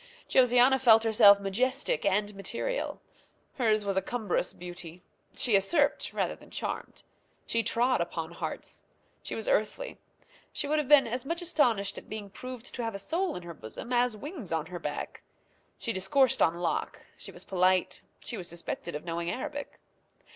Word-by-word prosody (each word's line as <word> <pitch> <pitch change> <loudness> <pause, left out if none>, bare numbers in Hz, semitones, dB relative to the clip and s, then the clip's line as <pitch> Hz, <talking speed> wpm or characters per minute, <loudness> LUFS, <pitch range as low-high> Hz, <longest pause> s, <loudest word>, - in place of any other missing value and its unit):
Josiana 250 +1 +5
felt 225 -3 +7
herself 210 -2 +7
majestic 255 - 0
and 205 +1 +1
material. 235 - -3 0.6
Hers 215 -3 +2
was 195 -1 0
a - - +4
cumbrous 215 -7 -1
beauty. 175 0 -8 0.3
She 240 - +3
usurped 285 - +3
rather - - -1
than - - -17
charmed. - - -5 0.4
She 230 - +1
trod 235 +1 +2
upon 170 -1 -3
hearts. 170 - -6 0.4
She - - -5
was - - -4
earthly. - - 0 0.5
She 290 - -3
would 305 +1 +2
have 295 - -2
been 290 -2 +7
as 240 +2 -2
much 335 +5 -2
astonished 240 - +2
at - - -19
being 205 -2 -6
proved 255 +2 -8
to 245 - -3
have 225 -2 -3
a - - -2
soul 335 - -1
in 180 - -6
her 170 -1 -7
bosom 150 - -7
as 245 -2 +2
wings 280 - -7
on 160 -1 0
her 175 +1 -7
back. - - -5 0.6
She 230 - -2
discoursed 220 +8 +3
on 165 - +4
Locke; 170 -1 -2
she - - -7
was - - -10
polite; 185 -1 +2 0.2
she 235 - -2
was 180 -3 -4
suspected 170 -1 -5
of 150 - -6
knowing 170 0 -2
Arabic. 285 +6 -5
220 Hz, 170 wpm, -29 LUFS, 185-260 Hz, 0.6 s, felt